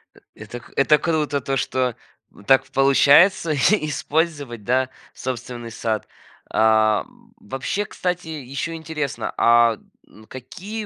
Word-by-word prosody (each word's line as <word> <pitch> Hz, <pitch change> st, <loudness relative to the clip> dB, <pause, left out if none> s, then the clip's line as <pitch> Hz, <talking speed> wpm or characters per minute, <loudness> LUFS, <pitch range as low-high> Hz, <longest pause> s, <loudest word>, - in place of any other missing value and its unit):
Э -, -, -18 dB, 0.2 s
это 110 Hz, +3 st, -9 dB
к 120 Hz, -, -18 dB
это 150 Hz, +2 st, +4 dB
круто, 150 Hz, -4 st, -1 dB
то 135 Hz, 0 st, -2 dB
что 125 Hz, -2 st, -1 dB, 0.3 s
в 105 Hz, -, -18 dB
так 135 Hz, +5 st, +4 dB
получается 145 Hz, +6 st, +5 dB
и 155 Hz, +3 st, +2 dB
использовать, 145 Hz, -6 st, -2 dB
да, 130 Hz, +3 st, +1 dB, 0.2 s
собственный 120 Hz, -2 st, -6 dB
сад. 110 Hz, -1 st, -3 dB, 0.4 s
А, 110 Hz, -1 st, +3 dB, 0.3 s
вообще, 205 Hz, -, -4 dB
кстати, 180 Hz, -3 st, -3 dB
еще 145 Hz, +1 st, -5 dB
интересно, 155 Hz, -3 st, -4 dB
а 115 Hz, -1 st, +4 dB, 0.3 s
н 110 Hz, -, -18 dB
какие 200 Hz, -, -8 dB
135 Hz, 125 wpm, -22 LUFS, 120-160 Hz, 0.4 s, получается